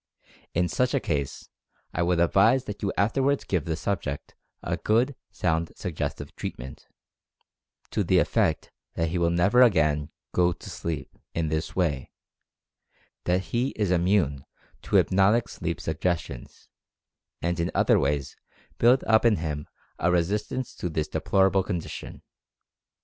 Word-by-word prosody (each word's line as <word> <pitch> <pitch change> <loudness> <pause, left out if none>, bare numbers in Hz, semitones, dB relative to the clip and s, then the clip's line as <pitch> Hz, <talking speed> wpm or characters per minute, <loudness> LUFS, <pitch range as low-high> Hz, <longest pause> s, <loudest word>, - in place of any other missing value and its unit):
In 90 +1 +2
such 125 +7 +1
a - - +3
case, 70 -2 -3 0.5
I - - -1
would 85 0 +2
advise 110 +9 +4
that 105 -4 -7
you 100 - 0
afterward 135 +7 +1
give 90 -6 0
the 80 - -1
subject 85 -6 -3 0.3
a - - -1
good, 120 +5 +1
sound 80 -2 -1
suggestive 80 -6 -4
treatment, 65 +2 -7 1.0
to - - +1
the - - +3
effect - - +1 0.2
that 80 -1 0
he 90 +2 -1
will 85 -1 +3
never 95 +8 +4
again 75 -10 +3 0.2
"go 90 0 +3
to - - -11
sleep" 80 -5 -5 0.2
in 80 -2 0
this 80 +1 -2
way 75 -8 0 0.6
— - - -41
that 90 +1 +2
he 125 +3 +1
is 105 -4 0
immune 85 -6 +2 0.4
to - - -3
hypnotic 100 +5 +4
sleep - - -4
suggestions 75 -8 -3 0.4
— - - -61
and 85 0 0
in 85 +1 0
other - - +4
ways 70 -1 -1 0.4
build 125 +3 +5
up 110 -1 +4
in 115 -3 +5
him 75 -4 -4 0.3
a 90 - +2
resistance 105 +8 -1
to 90 - -4
this 75 -1 -2
deplorable 95 0 +2
condition. 90 -3 -5
90 Hz, 145 wpm, -26 LUFS, 80-105 Hz, 1.0 s, build